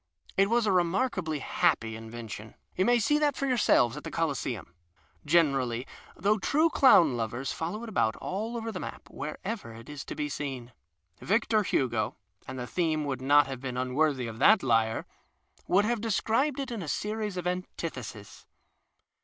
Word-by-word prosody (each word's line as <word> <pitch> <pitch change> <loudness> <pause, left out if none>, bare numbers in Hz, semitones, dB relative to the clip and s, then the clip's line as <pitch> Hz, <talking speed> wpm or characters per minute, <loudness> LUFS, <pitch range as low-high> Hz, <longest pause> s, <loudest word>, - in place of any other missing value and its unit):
It 195 +1 +3
was 235 0 +3
a 205 - +2
remarkably 180 -2 +1
happy 110 -4 +1
invention. 110 -1 -8 0.2
You 185 - +2
may 245 +2 +5
sec 295 +7 +2
that 295 -2 +2
for 275 - -2
yourselves 220 - +3
at 150 - -7
the - - -5
Coliseum, 140 - -2 0.5
generally, 135 -7 +2 0.3
though 205 +4 +1
true 310 - +2
clown 170 - +6
lovers 120 +3 -3
follow 175 +8 -4
it - - -6
about 110 - +1
all 220 +5 -4
over 225 0 -4
the 185 - -5
map - - -7
wherever 155 - -5
it 115 +3 -12
is 145 -2 -6
to - - -6
be 150 - -2
seen. 135 -5 -5 0.5
Victor 220 +1 +2
Hugo 120 - 0 0.3
(and 130 - -6
the 125 - -4
theme 155 0 0
would 135 -3 -3
not 145 +2 +5
have 135 -2 -6
been 130 -2 -4
im 125 0 -2
worthy 145 -3 +2
of 115 0 -7
that 215 +9 +6
lyre) 115 -3 +2 0.6
would 200 +3 +4
have 235 -1 0
described 230 +6 +1
it 270 -2 -3
in 230 -4 -4
a 165 - -6
scries 210 +3 -2
of 180 - -4
antitheses. 165 - -5
160 Hz, 175 wpm, -29 LUFS, -, 0.6 s, clown